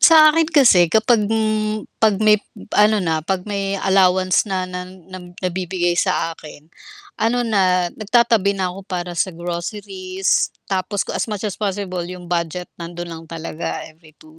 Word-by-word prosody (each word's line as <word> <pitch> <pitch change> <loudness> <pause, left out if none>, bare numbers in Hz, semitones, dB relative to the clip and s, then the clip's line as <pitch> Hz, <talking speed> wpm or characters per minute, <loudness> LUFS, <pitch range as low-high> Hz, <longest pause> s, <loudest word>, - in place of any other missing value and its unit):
Sa 310 -2 +8
akin 325 +1 +2
kasi 255 - +5
kapag, 220 +4 +3
hmm, 215 -1 0 0.2
'pag 215 -2 +2
may 215 0 +5 0.4
ano 210 -1 +4
na, 160 -3 0
'pag 180 +4 -2
may 200 -1 -3
allowance 185 0 +3
na 190 -2 -1
na 180 0 -5
nam 185 -1 -12
nabibigay 180 -1 -1
sa 165 -1 +1
akin, 150 0 -13 0.5
ano 235 +3 +1
na, 185 -6 +2
nagtatabi 215 -2 +2
na 190 -2 -1
ako 190 +1 -10
para 180 -1 -4
sa 185 0 0
groceries. 185 +2 -2 0.2
Tapos 190 +1 -1
ku - - -7
as - - -2
much 210 -3 -5
as 210 -3 -4
possible 195 -3 -3
'yong 180 -1 -9
budget 175 +1 -2
nando'n 175 0 -7
lang 165 0 -8
talaga 165 0 -5
every 155 -1 -21
2 155 +1 -19
185 Hz, 165 wpm, -20 LUFS, 175-210 Hz, 0.5 s, Sa